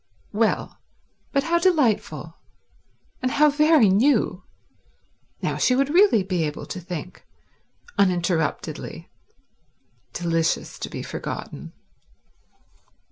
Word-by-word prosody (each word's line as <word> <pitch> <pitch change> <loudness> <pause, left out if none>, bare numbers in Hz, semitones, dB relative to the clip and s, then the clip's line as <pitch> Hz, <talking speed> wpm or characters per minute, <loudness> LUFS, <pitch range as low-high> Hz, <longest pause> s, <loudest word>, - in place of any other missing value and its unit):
Well, - - 0 0.5
but 275 -1 +1
how 340 +2 +1
delightful, 310 - +1 0.9
and 255 - 0
how 300 0 +5
very 300 -4 +5
new. 210 -1 +2 1.0
Now - - -1
she 250 - +3
would 275 +1 +1
really 360 - +5
be 185 -3 -1
able 150 -1 -4
to 185 - -6
think, 175 0 -7 0.8
uninterruptedly. 175 -4 -1 1.0
Delicious 165 -2 -1
to - - -5
be - - -6
forgotten. - - -6
215 Hz, 95 wpm, -23 LUFS, 175-295 Hz, 1.0 s, how